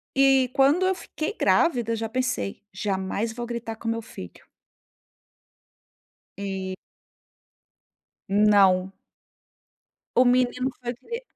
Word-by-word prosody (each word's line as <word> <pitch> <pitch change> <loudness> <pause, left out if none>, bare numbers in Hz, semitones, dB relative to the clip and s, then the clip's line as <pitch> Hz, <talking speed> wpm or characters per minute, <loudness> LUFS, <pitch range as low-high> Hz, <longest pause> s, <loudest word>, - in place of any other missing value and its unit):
e 270 -1 +4
quando 285 +7 +4
eu 380 0 +2
fiquei 315 +2 -5
grávida, 240 - +2
já 225 0 -3
pensei: 225 - -2
"Jamais 195 +3 -2
vou 240 +1 -5
gritar 235 -1 -5
com 225 - -9
o - - +2
meu 230 0 -3
filho". 225 - -11 1.9
E 190 -1 -4 1.5
Não! 195 -2 +4 1.3
O 250 - +7
menino 250 +1 +2
foi 240 0 -3
cri 465 - -7
230 Hz, 105 wpm, -25 LUFS, 200-255 Hz, 1.9 s, O